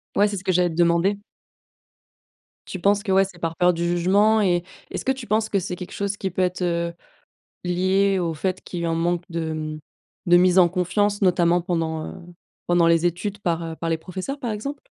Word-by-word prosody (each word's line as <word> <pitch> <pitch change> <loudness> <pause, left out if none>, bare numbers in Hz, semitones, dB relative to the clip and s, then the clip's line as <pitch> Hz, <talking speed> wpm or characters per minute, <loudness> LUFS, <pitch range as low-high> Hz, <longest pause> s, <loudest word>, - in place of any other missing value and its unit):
Ouais, 205 +1 +4
c'est 200 - -4
ce 185 - -7
que 185 - +2
j'allais 180 0 +3
te 160 - -7
demander. 170 +4 +2 1.5
Tu 190 - -6
penses 200 +3 +2
que 205 - -2
ouais, 195 +1 +5
c'est 185 -2 -12
par 165 -1 -3
peur 180 +2 +3
du 170 0 -2
jugement, 200 +6 +3
et 175 -3 +2 0.3
est-ce - - -5
que 265 - +3
tu 265 -3 -5
penses 215 +1 +1
que 200 - +1
c'est 180 0 -4
quelque 180 0 -8
chose 200 0 -3
qui 190 -2 -3
peut 185 - -2
être, 180 0 0
heu, 170 -1 -1 0.7
lié 190 +2 +2
au 170 -2 -1
fait 185 +4 -2
qu'il 175 - -6
y - - -1
a - - 0
un - - 0
manque 170 +1 0
de, 165 -2 -3
mmh, 155 0 -5 0.5
de 175 0 +7
mise 180 +1 +5
en 175 -2 +6
confiance, 200 +4 0
notamment 175 -1 +3
pendant, 165 -3 -2
heu, - - -7 0.5
pendant 175 -1 +4
les 170 +1 +4
études, 190 +4 -4
par, 170 -4 -1
heu, 165 -1 -6
par 165 +1 -4
les 165 - +1
professeurs, 185 - -6
par 240 -4 -3
exemple? 275 +7 -5
180 Hz, 225 wpm, -23 LUFS, 170-195 Hz, 1.5 s, de